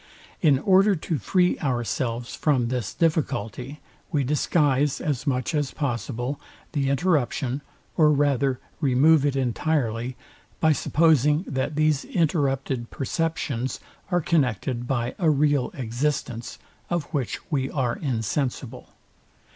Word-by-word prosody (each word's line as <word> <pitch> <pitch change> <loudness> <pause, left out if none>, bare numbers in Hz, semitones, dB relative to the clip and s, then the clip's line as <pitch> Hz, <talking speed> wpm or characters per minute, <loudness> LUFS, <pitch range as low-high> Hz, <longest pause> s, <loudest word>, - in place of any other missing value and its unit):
In 145 -5 +5
order 195 +6 +4
to 160 -2 -3
free 180 - +2
ourselves 120 -2 -2
from 130 -6 +1
this 125 -5 -2
difficulty, 135 - -1 0.3
we 145 -4 +1
disguise, 145 0 +1
as 145 -2 -2
much 130 +3 0
as 145 -3 0
possible, 130 -1 -3 0.3
the 140 -3 0
interruption, 140 -3 0 0.4
or 155 -2 +6
rather 140 -3 +2 0.2
remove 145 +1 +4
it 140 - -1
entirely, 125 -2 -1 0.4
by 160 - +4
supposing 150 +1 +3
that 135 +2 -2
these 155 -2 +2
interrupted 135 -7 0
perceptions 135 -4 -2 0.3
are 175 -1 +2
connected 125 - 0
by 120 -2 -1
a 170 -4 +3
real 145 -3 +2
existence, 125 -1 -3 0.3
of 175 -2 0
which 135 -6 -1
we 135 -3 0
are 125 -5 -1
insensible. 125 -1 -3
140 Hz, 115 wpm, -25 LUFS, 125-155 Hz, 0.4 s, or